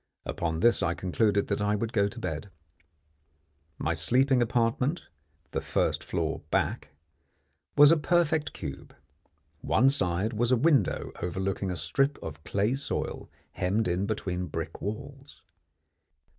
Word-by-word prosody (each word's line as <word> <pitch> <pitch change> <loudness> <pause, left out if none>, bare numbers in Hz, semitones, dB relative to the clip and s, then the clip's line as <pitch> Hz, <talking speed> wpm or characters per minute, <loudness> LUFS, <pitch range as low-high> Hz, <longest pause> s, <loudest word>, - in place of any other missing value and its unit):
Upon 80 -1 -2
this 120 0 +4
I 85 - 0
concluded 100 +2 +1
that - - 0
I 105 0 +1
would 110 +2 -3
go 100 -2 +3
to 100 - -8
bed. 90 +2 -4 1.3
My - - -1
sleeping 130 +1 +3
apartment 120 +6 +1 0.5
the - - -2
first - - 0
floor - - -2
back - - -1 0.9
was 145 +1 +9
a 165 - +5
perfect 160 -1 +1
cube. 70 -5 -8 0.6
One 130 - +3
side 95 -3 0
was 120 +3 +1
a 130 - +5
window 140 - +2
overlooking 95 +2 -2
a 90 - -2
strip 135 - +1
of 80 -1 -7
clay 100 +7 0
soil 140 +1 -3 0.2
hemmed 95 +4 0
in 90 +3 0
between 90 -4 -2
brick - - -5
walls. 135 +7 -7
110 Hz, 135 wpm, -28 LUFS, 90-135 Hz, 1.3 s, was